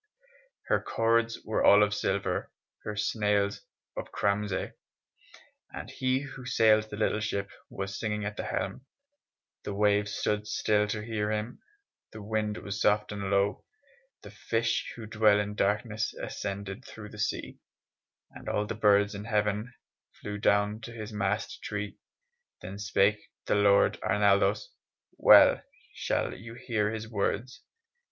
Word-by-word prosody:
Her - - +1
cords 115 0 +1
were 110 - 0
all 100 +1 +7
of 105 0 +1
silver, 100 -1 -1 0.3
Her 105 - -5
sails 105 -1 0 0.3
of - - -6
cramasy; 100 -1 -1 1.0
And - - -7
he 130 +1 0
who 135 -2 -9
sailed 110 -3 +3
the 105 - -6
little 110 0 +1
ship 100 -2 -3 0.2
Was 100 0 -5
singing 105 -2 -2
at 105 +1 -4
the - - -4
helm; 135 - -3 0.8
The 100 - -4
waves 105 0 +2
stood 105 0 -1
still 105 0 +1
to 105 +1 -3
hear 105 -2 -2
him, 110 +3 -3 0.5
The 110 - -8
wind 105 0 -1
was 100 +2 -5
soft 105 0 +2
and 100 -1 -4
low; 100 +1 +1 0.6
The - - -10
fish 115 0 -1
who 115 - -8
dwell 110 -1 +4
in 105 0 -2
darkness 105 +2 -1
Ascended 100 -1 -5
through 105 -1 -10
the 105 - -11
sea, - - -3 0.7
And - - -8
all 105 - 0
the - - -4
birds 105 -1 +3
in 100 +1 -6
heaven 105 +1 0 0.4
Flew 105 0 -6
down 105 +1 +2
to 115 - -8
his 110 -1 -7
mast 105 +1 -2
tree. 105 -1 -5 0.6
Then 100 +2 -7
spake 105 +1 +1 0.2
the - - +1
Lord 100 -1 +4
Arnaldos, 100 0 +2 0.5
(Well - - +8 0.3
shall - - -1
you 115 +3 -10
hear 110 -4 -1
his 110 0 -5
words!) 110 +3 -2
105 Hz, 145 wpm, -29 LUFS, 100-110 Hz, 1.0 s, Well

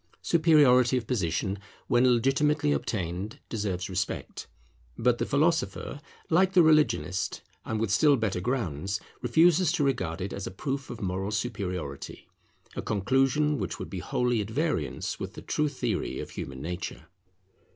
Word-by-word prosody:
Superiority 145 -7 +5
of 120 - -3
position, 95 -3 -1 0.3
when 125 +1 +4
legitimately 145 +5 +2
obtained, 95 -4 -2
deserves 100 -5 -2
respect; 95 +2 -4 0.5
but 120 0 +2
the - - -1
philosopher, 155 -1 0 0.3
like 185 +3 +3
the 180 - +7
religionist, 150 - +2 0.2
and 110 - -2
with 110 -3 0
still 145 +8 +5
better 105 -6 -1
grounds, 100 - -2 0.2
refuses 160 +6 +4
to 160 - +1
regard 120 -12 -1
it 95 +1 -4
as 100 -1 -5
a - - -3
proof 135 +8 -4
of 120 -1 -7
moral 95 +1 -2
superiority, 90 - -4 0.5
a - - -2
conclusion 135 +8 +1
which - - -3
would - - -7
be - - -4
wholly 125 -2 0
at 105 - -5
variance 115 - -2
with - - -5
the - - -8
true 150 0 0
theory 140 - -2
of - - -6
human 65 0 -6
nature. 85 -2 -5
120 Hz, 150 wpm, -28 LUFS, 95-145 Hz, 0.5 s, the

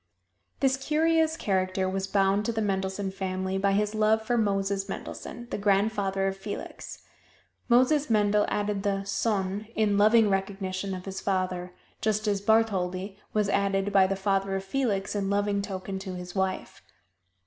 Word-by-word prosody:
This 265 -1 +3
curious 320 +3 +2
character 190 - 0
was 190 +1 -2
bound 195 +1 +2
to 235 - 0
the 225 - -2
Mendelssohn 190 0 -1
family 190 0 -2
by 195 0 +2
his 210 +1 +1
love 215 0 +2
for 240 +2 0
Moses 195 -2 0
Mendelssohn, 240 +4 -7
the - - -2
grandfather 200 -1 +1
of 195 0 0
Felix. 200 +1 -7 0.7
Moses 260 +4 +4
Mendel 210 -1 +3
added 205 -1 -1
the 195 -1 -1
"sohn" 200 0 -1
in 205 -2 +2
loving 215 +1 +6
recognition 195 -1 -2
of 185 - -8
his 190 -1 -5
father, 185 -2 -1 0.3
just 215 0 0
as 200 -1 +1
"Bartholdy" 195 -3 +1 0.2
was 210 -1 +1
added 200 0 0
by 190 -1 +6
the 195 - -1
father 195 0 0
of 195 - -2
Felix 200 -3 -1
in 195 -1 -1
loving 200 0 +1
token 195 -1 -5
to 190 -1 -6
his 180 0 -7
wife. 190 -1 -2
200 Hz, 160 wpm, -27 LUFS, 195-215 Hz, 0.7 s, loving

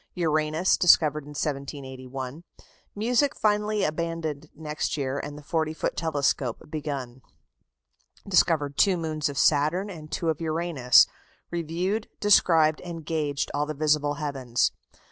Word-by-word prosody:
Uranus 155 0 +1
discovered 150 -4 +4
in 145 0 -11
1781. 135 0 -5 0.5
Music 245 +6 +1
finally 210 0 +1
abandoned 155 -2 -3
next 150 0 -3
year, 135 -1 -2
and 145 +1 -6
the 150 - -11
40 160 +1 -1
foot - - -2
telescope 140 -6 -1
begun. 140 -5 -5 1.1
Discovered 160 -6 +2
two 190 -3 +4
moons 155 -2 -2
of 140 - -7
Saturn 155 +9 +2
and 155 -4 -10
two 165 +2 -1
of 160 0 -2
Uranus. 160 -6 +4 0.5
Reviewed, 175 +6 -2
described, 165 -6 +4
and 165 -3 -7
gauged 150 -3 -2
all 145 +1 0
the 155 - -4
visible 150 0 +1
heavens. 135 -5 0
155 Hz, 125 wpm, -26 LUFS, 145-170 Hz, 1.1 s, discovered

